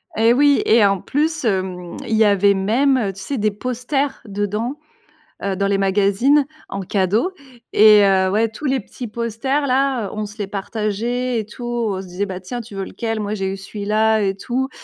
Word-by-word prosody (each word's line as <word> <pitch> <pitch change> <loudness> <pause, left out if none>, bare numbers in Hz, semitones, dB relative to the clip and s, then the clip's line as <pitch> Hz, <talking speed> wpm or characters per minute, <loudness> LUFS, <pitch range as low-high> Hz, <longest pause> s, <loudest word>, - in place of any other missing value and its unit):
Et 225 +2 +4
oui 285 +2 +4
et 220 -1 +5
en 195 -2 +1
plus, 310 +1 -1
hem, 185 -4 -2
il 225 - 0
y 220 - +5
avait 200 -1 +4
même, 245 +8 +2
heu, 200 -5 -1
tu 195 - -12
sais, 275 +7 -3
des 210 0 +1
posters 255 +6 -2
dedans, 210 +7 -3 0.6
heu, 195 -1 -1
dans 200 +1 0
les 200 0 +2
magazines, 205 +9 +3 0.2
en 195 - -4
cadeau 200 - 0 0.4
et 210 -1 +7
heu, 190 -1 +3
ouais, 220 +3 +2
tous 225 +8 -11
les 265 0 +1
petits 240 +3 -8
posters-là, 255 +1 0
on 215 0 -3
se 205 +2 -13
les 205 - -2
partageait 220 +4 -2
et 210 - -6
tout. 240 +3 -10
On 230 -5 -1
se 190 - -9
disait: 185 +3 -3
«Bah, 185 -1 -6
tiens, 240 +6 -6
tu 215 -3 -10
veux 195 0 -3
lequel? 225 +1 -4
Moi, 210 +1 -2
j'ai 195 -1 -2
eu - - -4
celui-là 215 +2 0
et 195 -1 0
tout» 260 +5 -2
215 Hz, 200 wpm, -20 LUFS, 195-245 Hz, 0.6 s, et